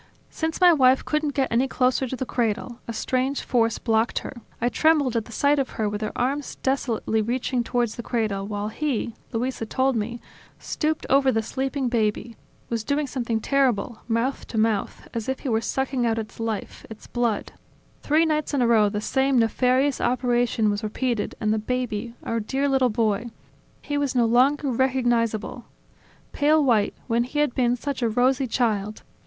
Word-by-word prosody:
Since 320 0 -3
my 360 -2 +7
wife 260 -3 +4
couldn't 305 -2 -1
get 270 -2 0
any 245 +4 +2
closer 255 0 +1
to 260 - -4
the 260 - -3
cradle; 235 0 -2
a - - -3
strange 255 +4 -1
force 230 -3 +1
blocked 225 0 +1
her... - - -6 0.3
I 240 - +1
trembled 290 -1 +2
at 225 -2 0
the - - -13
sight 285 +5 +2
of 270 - -1
her 215 - 0
with 205 +1 -3
her 215 - -2
arms 275 +3 -1
desolately 235 -4 0
reaching 245 +2 -1
towards 240 -2 0
the - - -5
cradle, 215 -5 -2
while 205 0 -3
he 245 -2 -2 0.2
Luisa 240 -1 -2
told 260 +2 +1
me 235 +2 -3 0.4
stooped 310 0 -2
over 270 -1 +4
the 225 -2 0
sleeping 265 +3 -2
baby, 230 0 -1 0.3
was 230 -2 -2
doing 285 +4 0
something 240 -4 -2
terrible, 245 -3 +1
mouth 235 +4 -1
to 225 - -5
mouth, 215 -2 0
as 230 +1 -3
if 265 - -2
he 275 - -3
were 225 -1 +1
sucking 265 +1 -1
out 225 -1 +1
its 220 0 -6
life, 225 -2 -4
its 220 -1 -11
blood... 235 -3 -1 0.5
Three 310 +3 +3
nights 305 -2 0
in 260 - +2
a - - +3
row 220 -3 +4
the 210 0 -3
same 265 +3 +1
nefarious 255 +4 +2
operation 240 -3 +1
was 205 0 -2
repeated 230 +1 -2
and 215 0 +1
the 220 - 0
baby, 235 -1 -3
our 230 - -1
dear 270 +6 -1
little 265 -2 +3
boy... 220 +1 0 0.5
he 290 0 -2
was 280 -2 -1
no 240 -2 +4
longer 265 +4 +3
recognizable. 240 -2 0 0.7
Pale 305 +1 +3
white, 225 -6 +2
when 235 -1 +1
he 255 +4 -6
had 295 -4 +2
been 245 -1 +2
such 275 +1 -4
a 235 - +2
rosy 255 +3 +2
child! 215 -4 -1
245 Hz, 185 wpm, -24 LUFS, 225-265 Hz, 0.7 s, my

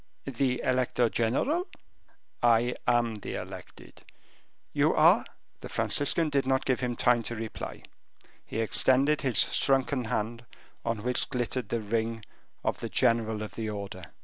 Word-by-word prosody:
"The 130 -1 -1
elector 125 -2 +1
general?" 270 - 0 0.7
"I 120 +1 +3
am 120 -3 +1
the - - -6
elected." - - -10 0.7
"You - - +2
are - - +5 0.2
" - - -43
The - - -8
Franciscan 150 +2 +3
did 140 -2 +1
not 130 0 +1
give 130 -2 +1
him 125 -2 -2
time 120 0 +3
to 120 +1 -4
reply; 110 -1 -6 0.6
he 115 - -3
extended 135 +6 +3
his 130 -6 -1 0.2
shrunken 135 -1 +1
hand, 115 +2 -3 0.4
on 115 -2 -2
which 125 0 +1
glittered 125 -3 -2
the 115 - -1
ring 110 0 -2 0.4
of - - -1
the - - -5
general 110 -2 +1
of 105 - -7
the 110 -1 -4
order. 100 -3 -6
120 Hz, 150 wpm, -28 LUFS, 115-130 Hz, 0.7 s, are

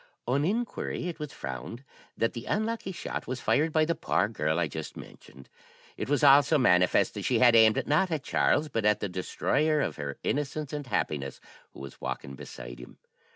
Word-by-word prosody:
"On 135 +4 +1
inquiry, 215 -1 -2
it 165 -2 -6
was 150 -2 -5
found 65 - -7 0.3
that 115 - 0
the 115 - -7
unlucky 220 -1 -1
shot 180 - -5
was 130 0 -3
fired 155 +6 +1
by 155 0 +3
the 170 - +1
poor 105 - 0
girl 80 -7 -1
I 85 -2 +1
just 80 +2 -7
mentioned. 65 - -13 0.5
It - - -5
was 145 -2 +1
also 145 +2 +6
manifest 90 -8 +3
that - - -5
she - - +2
had 120 -2 +6
aimed, 110 -1 +5
not 155 +6 +2
at 155 -4 -2
Charles, 150 +1 +2
but 115 -7 -2
at 105 0 +3
the 105 - -2
destroyer 150 - 0
of - - -2
her 70 -2 -5
innocence 145 +1 -2
and 145 -2 -4
happiness, 70 - -2 0.3
who - - -11
was 70 -1 -10
walking 70 - -5
beside - - -9
him. - - -12
125 Hz, 195 wpm, -28 LUFS, -, 0.5 s, also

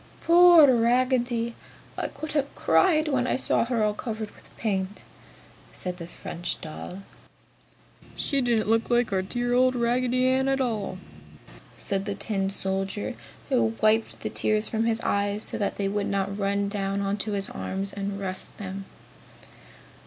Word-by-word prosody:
"Poor 340 -5 +7
Raggedy! 240 0 +1 0.4
I - - -2
could 310 - -7
have 285 -2 -1
cried 320 -4 +3
when 260 -4 +1
I - - +1
saw 260 - +2
her 235 -2 0
all 210 0 +2
covered 220 -1 -5
with - - -18
paint!" 195 -2 -2 0.7
said 180 -1 -5
the 170 -2 -7
French 175 0 -2
doll. 180 +4 -8 1.1
"She 280 -2 +1
didn't 235 -4 +1
look 225 +1 +2
like 240 -3 +2
our 190 - +2
dear 245 +5 -2
old 255 +1 +4
Raggedy 250 +1 +1
Ann 260 +1 +2
at 270 0 +1
all!" 215 -7 -2 0.8
said 195 -1 -2
the 200 -1 -3
tin 195 -2 -1
soldier, 195 +1 -2 0.4
who 235 -4 +2
wiped 220 +1 +2
the - - -4
tears 215 0 +1
from 225 0 -1
his 225 0 +1
eyes 205 +1 0
so - - -2
that 200 - -1
they 200 - 0
would 200 0 -1
not 195 0 -1
run 200 0 0
down 200 -1 -2
on 200 +1 -1
his 200 -1 -1
arms 195 +1 -2
and 200 0 -4
rust 185 -1 -4
them. 195 -1 -6
215 Hz, 160 wpm, -26 LUFS, 195-245 Hz, 1.1 s, Poor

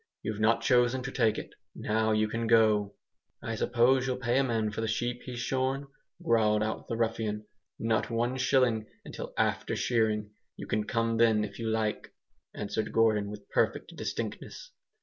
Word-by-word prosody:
You've 110 -1 -3
not 115 +1 +3
chosen 125 +1 +3
to 135 - -4
take 115 -5 +2
it. - - -6 0.2
Now 110 +1 0
you 110 0 +2
can 115 +1 -2
go!" 110 -3 +4 0.5
"I 115 - -3
suppose 125 +3 +2
you'll 130 -1 -1
pay 125 0 +1
a - - +3
man 110 -4 0
for 110 - -4
the 115 - -1
sheep 120 +2 -2
he's 125 -1 -6
shorn?" 130 +2 -1 0.4
growled 105 -5 +3
out 110 +1 -3
the 115 - -3
ruffian. 110 -2 -1 0.3
"Not 110 -1 0
one 120 +2 0
shilling 125 -4 +2 0.2
until - - -7
after - - 0
shearing. 110 -3 0 0.3
You - - -6
can 105 -1 -1
come 115 0 0
then 110 -2 +4
if 100 +1 -7
you 115 -1 -2
like," 110 -1 -2 0.4
answered 105 +1 -3
Gordon, 110 -3 +2
with 105 -1 -9
perfect - - 0
distinctness. - - -5
115 Hz, 170 wpm, -29 LUFS, 110-120 Hz, 0.5 s, go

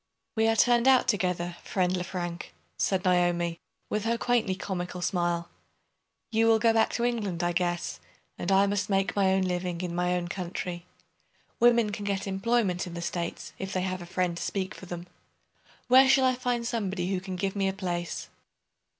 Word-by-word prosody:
"We 220 0 +3
are 225 - +3
turned 240 +2 +4
out 260 -1 +5
together, 180 -4 0
friend 185 -1 0
Lefrank," 175 -1 -5 0.2
said 190 0 0
Naomi, 175 -2 +2 0.3
with 210 -1 -2
her 230 +1 +1
quaintly 235 -6 +1
comical 180 -2 -4
smile. 175 -2 0 0.8
"You 225 0 +3
will 225 -1 +6
go 225 +1 +3
back 225 0 +3
to 235 - -1
England, 205 -8 -1
I 175 - +2
guess; 175 0 -1 0.4
and 180 - -3
I 195 +1 +5
must 200 0 -1
make 195 -1 +1
my 195 -2 +3
own 190 0 +2
living 180 -1 -2
in 180 -2 -3
my 180 +1 +1
own 175 -1 -2
country. 175 -1 -5 0.7
Women 235 -2 +4
can 205 0 -5
get 200 -1 -1
employment 195 -2 0
in 175 - -7
the 170 - -4
States 175 -1 -4
if 190 0 -4
they 185 - 0
have 185 0 -2
a 175 - -8
friend 180 -1 -1
to - - -5
speak 195 0 -2
for 190 - -11
them. 175 0 -6 0.8
Where 260 +1 +7
shall 265 0 +5
I 255 - +4
find 245 -1 -1
somebody 195 -6 -2
who 185 - -1
can 190 0 -5
give 195 +2 -2
me 195 -1 +1
a - - +1
place?" 175 -3 -3
190 Hz, 190 wpm, -28 LUFS, 175-215 Hz, 0.8 s, Where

